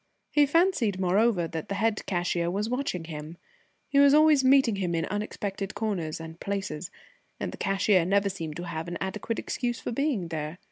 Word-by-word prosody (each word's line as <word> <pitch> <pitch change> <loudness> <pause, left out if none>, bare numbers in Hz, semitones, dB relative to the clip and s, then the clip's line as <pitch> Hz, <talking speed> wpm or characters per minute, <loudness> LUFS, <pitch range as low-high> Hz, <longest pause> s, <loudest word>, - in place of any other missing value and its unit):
He 295 -1 +4
fancied, 290 - +2
moreover, 190 0 +2
that 160 -1 -6
the 200 - -1
head 220 +1 0
cashier 175 -2 0
was 205 +5 -2
watching 250 -10 -2
him. 155 0 -8 0.5
He 280 - +2
was 280 0 +7
always 305 -3 +6
meeting 260 -5 +4
him 180 -3 -1
in 165 0 0
unexpected 205 -1 -4
corners 180 -9 -2
and 165 +1 -9
places, 190 -4 -4 0.5
and - - -3
the - - -9
cashier 195 -1 +3
never 200 +3 +2
seemed 165 -6 -4
to 175 - -5
have 165 -1 -5
an 175 0 -4
adequate 210 +4 -3
excuse 240 -2 -2
for - - -4
being 240 - -1
there. 155 +1 -4
195 Hz, 185 wpm, -27 LUFS, 170-230 Hz, 0.5 s, was